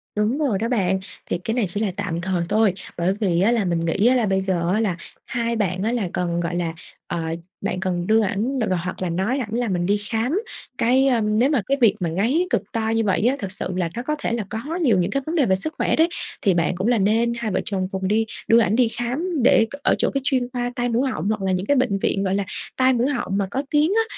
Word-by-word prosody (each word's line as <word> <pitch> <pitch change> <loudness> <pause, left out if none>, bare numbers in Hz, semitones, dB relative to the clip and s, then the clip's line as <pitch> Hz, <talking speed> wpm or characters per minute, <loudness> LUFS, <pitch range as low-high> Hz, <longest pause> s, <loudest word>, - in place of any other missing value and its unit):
Đúng 210 +6 +1
rồi 270 -10 +1
đó 225 - -1
bạn. 190 -6 +1 0.3
Thì - - -2
cái 225 +5 -3
này 235 -4 +1
chỉ 180 +4 -4
là 210 -3 0
tạm 175 -4 -2
thời 180 -2 -1
thôi, 215 -3 +3 0.2
bởi 175 +2 +1
vì 180 -5 +1
á 210 +5 +4
là 230 -4 +1
mình 170 -2 0
nghĩ 200 +7 +2
á 255 - +5
là 240 -3 +2
bây 190 -1 +1
giờ 180 -2 0
á, 215 - +2
là 200 -6 0 0.3
hai 235 -1 -1
bạn 190 -3 -1
á 225 - +1
là 220 -7 -1
cần, 175 -1 -1
gọi 170 0 -2
là 170 -2 -1 0.3
ờ, 170 - -3 0.4
bạn - - -2
cần 180 -2 -2
đưa 220 +1 +4
ảnh, 220 +7 -1
ờ, 185 - +2
hoặc 180 +2 -4
là 185 - -1
nói 195 +11 0
ảnh 220 -4 -4
là 240 0 0
mình 175 -3 0
đi 205 +2 +2
khám. 245 - 0 0.4
Cái, 260 +3 +3
ơ 240 -4 +3
nếu 215 +6 +2
mà 275 -8 +2
cái 275 - +2
việc 220 -3 +5
mà 170 -2 -1
ngáy 245 - +1
cực - - -1
to 225 -2 -1
như 225 0 +1
vậy 200 -2 +1
á 265 - +2
thực 195 -4 -4
sự 195 - -3
là 175 -2 0
nó 240 - -2
có 300 +3 -1
thể - - -2
là 230 -3 -1
có 220 - -3 0.2
nhiều 235 - +4
những 180 +3 0
cái 275 - 0
vấn 325 +2 -3
đề 285 -6 +3
về 190 - +3
sức 310 +12 -3
khỏe - - +1
đấy, 325 +2 +4 0.3
thì 195 - +3
bạn 170 +1 +1
cũng 190 +5 -1
là 240 -2 +3
nên 225 +4 +2
hai 235 -3 -2
vợ 185 - 0
chồng 190 -2 -1
cùng 190 -1 -2
đi 220 +2 +2 0.2
đưa 230 +1 +6
ảnh 210 -1 +2
đi 245 -1 +4
khám 260 +6 -2
để 225 -3 +5 0.2
ở - - +3
chỗ - - +1
cái 275 - 0
chuyên 255 -3 +1
khoa 245 0 -2
tai 245 -1 0
mũi 250 +3 +1
họng, 185 -2 -2
hoặc 215 -1 -1
là 190 -1 0
những 185 +1 -1
cái 285 +5 +2
bệnh 235 -6 +1
viện, 195 0 0
gọi 190 0 0
là, 200 - 0 0.3
tai 260 0 +4
mũi 245 +2 +1
họng 240 -8 -1
mà 195 -1 0
có 270 +5 -1
tiếng 300 +3 +3
á. 450 - +4
215 Hz, 280 wpm, -22 LUFS, 190-245 Hz, 0.4 s, đưa